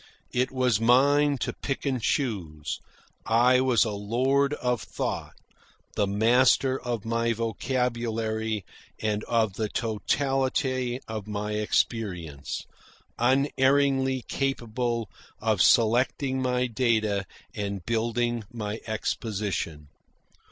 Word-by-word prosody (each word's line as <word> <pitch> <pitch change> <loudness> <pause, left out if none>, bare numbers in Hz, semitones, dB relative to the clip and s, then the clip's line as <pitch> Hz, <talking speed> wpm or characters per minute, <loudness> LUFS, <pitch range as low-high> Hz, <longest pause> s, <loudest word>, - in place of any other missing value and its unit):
It 125 +1 +1
was 125 -5 +1
mine 140 +4 +4
to - - -1
pick 135 0 -4
and 130 -3 0
choose. 85 - -2 0.4
I 125 +3 +4
was 125 -4 +3
a 110 - -2
lord 130 +8 +1
of 125 -5 -1
thought, - - -4 0.6
the 100 - +1
master 125 +5 +3
of 120 -4 -3
my 115 +1 +1
vocabulary 115 -2 -1 0.3
and 105 -1 -1
of 115 -4 +1
the 110 -2 -1
totality 130 +3 0
of 110 -2 -5
my 105 0 -3
experience, 100 - -1 0.5
unerringly 135 0 +2
capable 120 -4 -2 0.3
of 110 -4 +1
selecting 130 +5 +3
my 125 0 +1
data 110 -5 +1 0.3
and 100 -3 -4
building 120 +1 0
my 110 -2 -4
exposition. 105 -8 -3
115 Hz, 100 wpm, -27 LUFS, 105-130 Hz, 0.6 s, mine